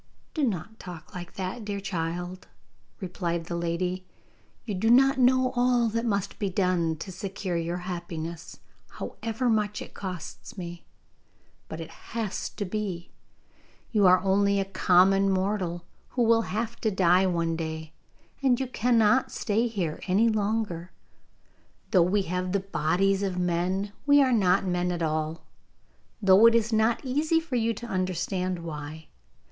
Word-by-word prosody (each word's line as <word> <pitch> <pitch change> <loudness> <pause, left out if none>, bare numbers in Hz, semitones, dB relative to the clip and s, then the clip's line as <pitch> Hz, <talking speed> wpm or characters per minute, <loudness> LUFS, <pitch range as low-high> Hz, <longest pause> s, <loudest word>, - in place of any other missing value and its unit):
'Do 310 - -1
not 220 - -2
talk 170 -3 -10
like 175 -2 -8
that, 190 +5 -4
dear 205 -1 -3
child,' 175 0 -4 0.5
replied 170 -3 -3
the 170 - -4
lady; 175 +2 -2 0.6
'you 215 - -3
do 205 +4 +1
not 270 +3 +5
know 255 0 +4
all 245 -1 +3
that 230 +2 -1
must 200 -3 -1
be 200 - 0
done 180 -3 +1
to 180 +5 -7
secure 190 0 -4
your 170 +1 -1
happiness, 170 -2 -6 0.3
however 230 +2 -3
much 210 -2 +1
it - - -9
costs 185 0 -7
me. 170 -2 -7 0.9
But 160 - -6
it 165 - -7
has 220 -3 -4
to 205 - -5
be. 185 -3 -4 0.8
You 210 -4 +4
are 180 0 +7
only 200 +1 +2
a 195 - 0
common 195 +1 +4
mortal, 185 -3 -1 0.2
who 245 - 0
will 230 0 +3
have 225 +4 -3
to 220 - +2
die 185 -1 +4
one 170 -2 0
day, 160 -1 -5 0.5
and 255 -3 +3
you 265 - 0
cannot 245 -1 +2
stay 225 +2 0
here 180 -9 -3
any 205 +5 +4
longer. 210 -5 -1 1.0
Though 185 -5 +5
we 190 +4 +2
have 180 +1 -2
the 200 - +2
bodies 195 +1 +1
of 190 -2 -2
men, 180 +3 0 0.2
we 285 0 +7
are 260 -2 +2
not 190 -4 +3
men 180 -1 0
at 175 -1 -2
all, 155 +1 -2 0.8
though 195 +3 +7
it 230 - +5
is 230 0 +1
not 220 +4 +2
easy 305 +5 +2
for 325 -6 -5
you 230 -1 +2
to 240 - -7
understand 185 -2 -1
why. 155 0 -7
190 Hz, 155 wpm, -27 LUFS, 175-220 Hz, 1.0 s, are